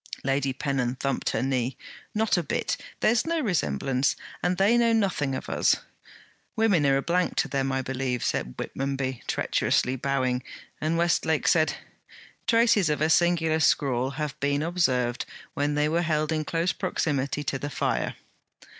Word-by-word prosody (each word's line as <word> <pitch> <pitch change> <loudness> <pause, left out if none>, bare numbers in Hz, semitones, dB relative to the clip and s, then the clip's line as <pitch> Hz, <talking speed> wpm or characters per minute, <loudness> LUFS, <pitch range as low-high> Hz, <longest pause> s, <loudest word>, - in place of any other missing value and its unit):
Lady 135 0 +1
Pennon 130 -2 -1
thumped 135 +1 -1
her - - -1
knee. 130 -1 -1 0.4
'Not 220 0 +2
a 175 - +1
bit. 150 - -1 0.3
There's 230 +6 +3
no 335 0 +1
resemblance, 135 - 0 0.3
and 180 0 0
they 200 +5 +4
know 235 -1 +4
nothing 185 -11 +1
of - - -6
us.' - - +3 0.8
'Women 200 -10 +3
are 135 0 +4
a 135 - -1
blank 180 +1 0
to - - +1
them, 135 -1 -1
I 130 0 -1
believe,' 130 -1 -2
said 60 - -2
Whitmonby, 135 -2 -3
treacherously 125 - +1
bowing; 130 -1 0 0.4
and 160 +2 0
Westlake 165 -2 +1
said: 155 -2 +3 0.7
'Traces 230 -6 +4
of 150 - 0
a 155 +2 +2
singular 165 -2 +3
scrawl 130 -4 +2
have 150 -3 -3
been 140 +1 0
observed 130 -8 0 0.3
when 145 +1 0
they 150 0 +2
were 165 +3 +1
held 155 -2 0
in 155 -1 -1
close 170 +3 0
proximity 145 -6 -1
to 135 -1 -2
the 145 - -4
fire.' - - -1
145 Hz, 160 wpm, -26 LUFS, 135-175 Hz, 0.8 s, they